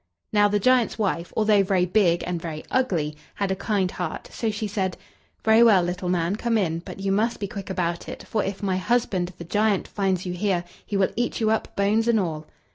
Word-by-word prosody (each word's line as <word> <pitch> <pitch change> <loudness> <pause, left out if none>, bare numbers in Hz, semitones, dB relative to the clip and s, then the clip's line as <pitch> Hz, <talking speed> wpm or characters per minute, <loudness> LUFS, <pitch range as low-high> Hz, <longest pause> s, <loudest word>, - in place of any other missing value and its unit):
Now, 205 -1 +5
the 205 0 +1
giant's 250 +3 +3
wife, 185 -5 -1
although 215 -2 +4
very 190 -2 +2
big 175 -2 +2
and 175 -2 -3
very 155 -2 -5
ugly, 175 -13 0 0.2
had 200 -1 -1
a - - +1
kind 195 -2 0
heart, 180 -3 -5
so 225 - -1
she 215 +1 -3
said: 190 -3 -2 0.5
"Very 220 +1 +6
well, 210 -6 +6
little 180 +1 -3
man, 180 +2 0
come 230 0 +1
in; 165 -5 0
but 175 - -9
you 195 0 -1
must 220 +4 +1
be 200 - -2
quick 200 -2 -7
about 175 -2 -2
it, - - -7
for 215 - -1
if 195 +1 -4
my 190 -2 +1
husband, 185 -3 0
the - - -7
giant, 205 +3 +1
finds 190 -3 -1
you 180 - -3
here, 180 -1 0 0.2
he 205 - -3
will 190 -1 +2
eat 240 +1 -1
you 220 -1 +2
up, 220 - -1
bones 210 +3 +2
and 230 -2 +4
all." 160 -5 -3
195 Hz, 220 wpm, -24 LUFS, 180-215 Hz, 0.5 s, Very